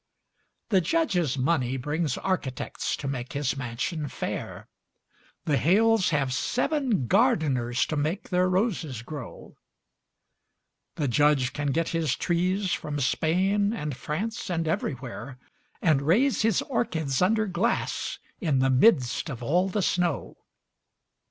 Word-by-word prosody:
The 195 -4 +4
Judge's 180 - +1
money 130 -2 +1
brings 150 +2 -1
architects 150 -9 -2
to 140 - -5
make 130 -1 -4
his 145 -1 -1
mansion 135 +5 -3
fair; - - -5 0.8
The 145 -3 +2
Hales 215 +5 +3
have 140 -5 0
seven 250 - 0
gardeners 125 -1 +2
to 155 - -3
make 155 +6 -2
their 180 0 +2
roses 180 - -1
grow; 140 -2 -9 1.4
The 145 - -1
Judge 140 0 +3
can 145 0 -2
get 160 +4 0
his 165 -2 0
trees 180 +2 0
from 145 -1 -3
Spain 190 - +1
and 150 - -4
France 210 - -4
and 165 -2 -1
everywhere, 130 -4 -4 0.5
And 155 -5 +3
raise 220 - +3
his 220 -3 +2
orchids 160 - -1
under 215 +4 +3
glass 190 +3 -1 0.2
in 155 -7 +1
the 130 0 +3
midst 130 - +3
of 125 -4 -6
all 180 +9 +2
the 200 +1 -1
snow. 180 -1 0
160 Hz, 125 wpm, -26 LUFS, 135-185 Hz, 1.4 s, The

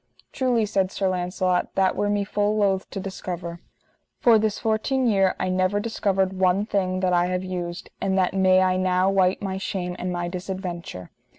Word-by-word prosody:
Truly, 245 -4 +1
said 195 -2 0
Sir 195 - -1
Launcelot, 180 0 -1
that 190 -1 +2
were 205 - 0
me 205 0 +1
full 205 +1 0
loath 195 -2 +1
to 195 - -5
discover. 175 -3 -6 0.6
For 230 -3 +5
this 215 -1 0
fourteen 225 +4 0
year 195 -5 +3
I 185 - -1
never 185 +2 +1
discovered 195 -3 0
one 190 +2 +2
thing 185 -3 -1
that 185 -1 +1
I 175 0 +3
have 180 0 -2
used, 180 -1 -5
and 195 -1 0
that 185 0 +2
may 185 -1 +4
I 185 0 +2
now 185 +1 +2
wite 190 0 +2
my 190 -1 -3
shame 180 -2 -3
and 180 0 -3
my 175 0 -2
disadventure. 175 - -6
190 Hz, 185 wpm, -24 LUFS, 180-200 Hz, 0.6 s, For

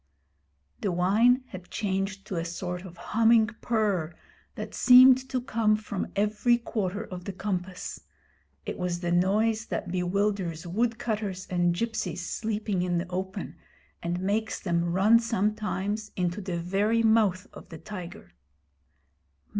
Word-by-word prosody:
The 200 - -1
whine 215 +9 +3
had 185 -2 -10
changed 195 -1 -2
to 190 - -4
a 165 - -1
sort 180 +2 -5
of 175 -2 -11
humming 225 -1 +3
purr 200 -8 0 0.4
that - - -6
seemed 260 +1 +7
to 255 - 0
come 225 -4 +1
from 210 -2 -4
every 210 +4 +2
quarter 210 -3 -3
of 180 -4 -8
the 200 - -3
compass. 185 -1 -4 0.6
It - - -5
was 180 -1 -2
the 175 -1 -1
noise 215 +5 +2
that 175 - -4
bewilders 180 -2 -1
woodcutters 215 -1 -2
and 175 -1 +2
gipsies 220 -4 -3
sleeping 210 -4 -2
in 180 -1 0
the 170 +1 -2
open, 190 +1 -4 0.4
and 175 +1 -2
makes 210 +4 -1
them 170 -2 0
run 195 +7 +4
sometimes 210 -1 -1
into 180 +2 -1
the 180 -3 -3
very 200 +6 +1
mouth 215 -5 +3
of - - -12
the 165 - -8
tiger. 180 -1 -9
200 Hz, 140 wpm, -27 LUFS, 180-220 Hz, 0.6 s, seemed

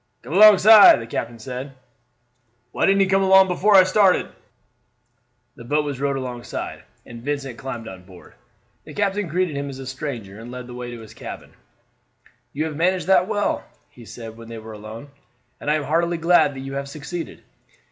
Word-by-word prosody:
"Come - - -8
alongside," 210 - +8
the 115 - -7
captain 115 0 -5
said. 130 +4 -7 1.0
"Why - - 0
didn't 195 0 +3
he - - +5
come 195 0 +2
on 190 - +1
board 190 0 +7
before 195 +3 +2
I 190 - +9
started?" 185 0 +2 1.3
The - - -12
boat 150 +5 0
was 140 -3 -5
rowed 140 0 -1
alongside, 125 -2 -6 0.2
and 120 -1 -11
Vincent 135 -2 -4
climbed 120 -4 -7
on 95 -3 -10
board. 90 -1 -16 0.5
The - - -12
captain 205 -1 -1
greeted 175 -1 -1
him 140 0 -4
as 135 - -8
a 135 - -8
stranger 125 -7 -6
and 115 +1 -10
led 125 0 -8
the 125 - -11
way 125 0 -7
to 120 -1 -9
his 110 - -13
cabin. - - -10 1.0
"You 155 +3 -3
have 155 -2 -5
managed 180 +4 0
that 190 -1 +3
well," 205 -1 -1 0.3
he 120 - -15
said 115 0 -10
when 115 0 -12
they 115 - -8
were 110 0 -10
alone, 110 +6 -10 0.5
"and - - -4
I 150 - +3
am 155 - -2
heartily 170 +3 0
glad 165 -4 +3
that 135 - -7
you 135 +1 -7
have 140 0 -5
succeeded. 155 +4 -7
140 Hz, 195 wpm, -22 LUFS, 120-180 Hz, 1.3 s, I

